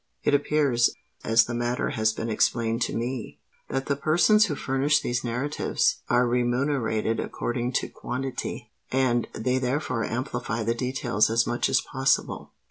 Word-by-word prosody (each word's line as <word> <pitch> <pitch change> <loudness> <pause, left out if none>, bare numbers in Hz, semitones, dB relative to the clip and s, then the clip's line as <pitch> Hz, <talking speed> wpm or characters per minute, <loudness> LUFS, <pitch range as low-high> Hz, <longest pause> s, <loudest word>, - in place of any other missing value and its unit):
It - - +2
appears—as 135 -5 +2
the 120 - -5
matter 120 +1 -1
has 110 0 +1
been 115 +1 -4
explained 115 +1 +1
to - - 0
me—that 125 +2 -5
the 140 - 0
persons 175 +9 +4
who 150 - -2
furnish 140 +2 +1
these 120 -2 -2
narratives 125 +5 0
are 125 +1 +4
remunerated 120 -2 0
according 120 +1 -3
to - - 0
quantity; 130 +1 -5 0.2
and 125 -3 +1
they 125 +3 0
therefore 130 -2 -1
amplify 120 -1 -3
the 115 +2 +1
details 120 -3 0
as 115 +1 +2
much 120 - 0
as - - +3
possible." 135 0 -1
125 Hz, 140 wpm, -26 LUFS, 115-135 Hz, 0.2 s, persons